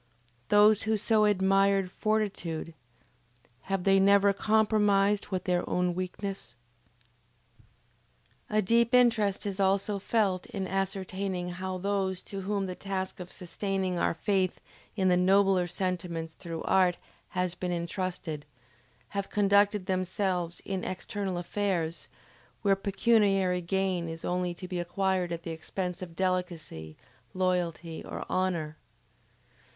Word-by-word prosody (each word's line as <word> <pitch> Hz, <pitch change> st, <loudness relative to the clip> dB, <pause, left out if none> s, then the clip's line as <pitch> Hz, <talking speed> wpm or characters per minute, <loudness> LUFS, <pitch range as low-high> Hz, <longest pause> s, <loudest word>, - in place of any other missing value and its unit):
Those 210 Hz, 0 st, +6 dB
who 220 Hz, 0 st, +1 dB
so 215 Hz, +1 st, +3 dB
admired 195 Hz, -1 st, +3 dB
fortitude, 195 Hz, -7 st, -2 dB, 1.0 s
have 195 Hz, -2 st, 0 dB
they 195 Hz, 0 st, +5 dB
never 200 Hz, +1 st, +5 dB
compromised 210 Hz, -1 st, +2 dB
with 185 Hz, -3 st, -3 dB
their 180 Hz, -1 st, +1 dB
own 180 Hz, 0 st, +1 dB
weakness? 185 Hz, -2 st, -5 dB, 1.9 s
A 215 Hz, 0 st, +2 dB
deep 235 Hz, +4 st, +3 dB
interest 225 Hz, -6 st, +3 dB
is 200 Hz, -1 st, -3 dB
also 195 Hz, +1 st, +2 dB
felt 195 Hz, -3 st, 0 dB
in 200 Hz, -6 st, -4 dB
ascertaining 190 Hz, -1 st, -2 dB
how 185 Hz, +1 st, -4 dB
those 190 Hz, -1 st, -1 dB
to 195 Hz, -1 st, -6 dB
whom 200 Hz, 0 st, -1 dB
the 185 Hz, -, -4 dB
task 190 Hz, 0 st, -4 dB
of 180 Hz, 0 st, -8 dB
sustaining 190 Hz, 0 st, -2 dB
our -, -, +1 dB
faith 185 Hz, +1 st, 0 dB, 0.4 s
in 190 Hz, -3 st, +1 dB
the 180 Hz, -, +5 dB
nobler 190 Hz, 0 st, +4 dB
sentiments 175 Hz, -2 st, -3 dB
through 165 Hz, -2 st, -6 dB
art 185 Hz, -2 st, +3 dB, 0.4 s
has 180 Hz, -1 st, +1 dB
been 180 Hz, 0 st, -3 dB
intrusted, 170 Hz, -3 st, -3 dB, 0.6 s
have 200 Hz, -1 st, -3 dB
conducted 205 Hz, -1 st, +3 dB
themselves 185 Hz, -2 st, -1 dB
in 190 Hz, -2 st, -3 dB
external 190 Hz, 0 st, -3 dB
affairs, 175 Hz, -2 st, -2 dB, 0.6 s
where 200 Hz, -2 st, +4 dB
pecuniary 195 Hz, -2 st, +2 dB
gain 185 Hz, -1 st, -1 dB
is 165 Hz, 0 st, -7 dB
only 180 Hz, -1 st, -1 dB
to 185 Hz, -, -7 dB
be 180 Hz, -1 st, -3 dB
acquired 185 Hz, 0 st, 0 dB
at 170 Hz, 0 st, -4 dB
the 165 Hz, -, -5 dB
expense 180 Hz, +3 st, -4 dB
of 170 Hz, -2 st, -8 dB
delicacy, 170 Hz, -, -3 dB, 0.4 s
loyalty, 175 Hz, -3 st, -1 dB
or -, -, -6 dB
honor. 170 Hz, -5 st, -1 dB
190 Hz, 125 wpm, -29 LUFS, 180-200 Hz, 1.9 s, Those